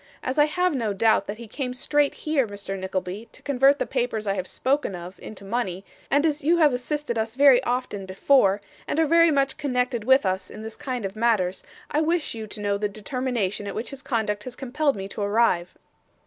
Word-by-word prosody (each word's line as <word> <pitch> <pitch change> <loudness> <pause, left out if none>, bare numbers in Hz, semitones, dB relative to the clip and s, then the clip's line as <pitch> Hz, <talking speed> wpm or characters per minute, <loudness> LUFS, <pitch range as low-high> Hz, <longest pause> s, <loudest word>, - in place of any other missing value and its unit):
As 260 +3 -1
I 295 - +7
have 360 +3 +1
no 230 -6 -1
doubt 220 +3 +3
that 205 - -5
he 235 0 -9
came 250 +2 -4
straight 290 +3 +1
here, 295 -6 0
Mr 200 -1 -6
Nickleby, 190 +3 -4
to - - -12
convert 275 0 +4
the - - -1
papers 240 -4 -2
I 195 - +1
have 185 -2 -3
spoken 270 -7 0
of, 175 +2 -9
into 200 -2 -10
money, 195 -4 -2 0.2
and 285 +3 +3
as 300 -2 0
you 335 +4 +4
have 305 -5 +5
assisted 250 -1 -2
us 220 +1 -2
very 275 -2 +6
often 245 -6 -2
before, 200 0 +3 0.3
and 310 - -1
are 325 - +4
very 335 +2 +5
much 275 -3 +1
connected 250 -5 -1
with 265 0 +4
us 185 0 -1
in 215 - -9
this 220 0 -7
kind 255 -6 -4
of 195 +1 -5
matters, 215 -5 +1 0.3
I 300 - +2
wish 330 0 0
you 220 -1 -6
to 210 0 -7
know 200 -1 0
the 210 0 0
determination 215 -2 -2
at - - -5
which 225 - -4
his 275 -1 -9
conduct 220 -6 -1
has 250 -1 -7
compelled 280 +2 0
me 195 -1 -5
to 210 - -6
arrive. 205 -4 +1
235 Hz, 220 wpm, -25 LUFS, 205-280 Hz, 0.3 s, I